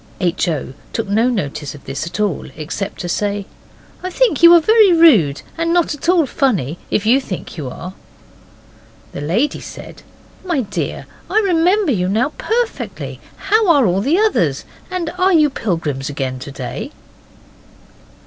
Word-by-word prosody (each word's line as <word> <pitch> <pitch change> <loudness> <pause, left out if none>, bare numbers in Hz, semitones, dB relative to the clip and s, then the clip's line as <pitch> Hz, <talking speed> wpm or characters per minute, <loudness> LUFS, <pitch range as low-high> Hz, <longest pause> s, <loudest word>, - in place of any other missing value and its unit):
H. 180 0 0
O. 150 -5 -3 0.2
took 225 -2 -2
no 220 +5 +2
notice 150 - -3
of 145 - -15
this 140 +4 -4
at 170 - -6
all, 205 -6 -1
except 165 +6 -5
to 175 - -4
say, 200 +2 -1 0.6
'I 370 - -4
think 430 - +1
you 340 0 +9
are - - +8
very 430 +3 +5
rude, 230 - +5 0.2
and 335 0 0
not 345 -3 +2
at 295 +3 -4
all 350 -4 +4
funny, 190 - -1
if 210 - 0
you 250 +5 +4
think 185 -8 -7
you 145 -6 -5
are.' 180 +8 -8 1.2
The - - -6
lady 215 - 0
said, - - -10 0.4
'My 340 -7 0
dear, 205 -4 -4 0.2
I - - 0
remember 365 -1 +2
you 180 -6 0
now 225 +7 +1
perfectly. 470 +1 -3 0.2
How 435 0 +1
are 285 -6 +5
all 185 0 +1
the 290 - +2
others, 435 +1 +1 0.2
and 360 -3 -3
are 375 +1 +4
you 305 -3 +4
pilgrims 160 - -2
again 130 -2 -3
to 135 +2 -8
day? 130 -3 -6
225 Hz, 165 wpm, -18 LUFS, -, 1.2 s, you